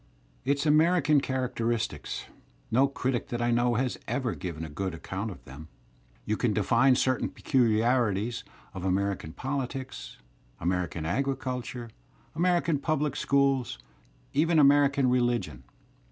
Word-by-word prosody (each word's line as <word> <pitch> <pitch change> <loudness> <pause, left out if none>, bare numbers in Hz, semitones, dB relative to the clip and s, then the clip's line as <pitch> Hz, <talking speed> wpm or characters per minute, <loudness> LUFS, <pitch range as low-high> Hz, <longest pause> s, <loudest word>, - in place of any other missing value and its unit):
Its 140 +2 +1
"Ajuerican" 155 -1 +4
characteristics 120 - -2 0.2
— - - -34
no 130 +5 +4
critic 130 -3 -2
that 120 - -3
I 120 0 +1
know 120 0 +2
has 125 +2 -1
ever 130 -5 -1
given 80 -3 -5
a - - -6
good 95 +4 -3
accoimt 95 +6 -5
of 100 - -11
them. 70 +4 -10 0.6
You 110 - 0
can 120 -4 +1
define 115 +6 +4
certain 130 0 +1
peculiarities 115 -2 +1 0.3
of 95 -2 -6
American 95 -3 -1
poUtics, 135 +1 -5 0.4
American 90 -2 -1
agriculture, 125 - -3 0.4
American 170 -2 +1
pubUc 150 0 0
schools, 140 -3 +1 0.6
even 160 +3 +3
American 140 -2 +5
religion. 120 - 0
125 Hz, 125 wpm, -28 LUFS, 105-140 Hz, 0.6 s, American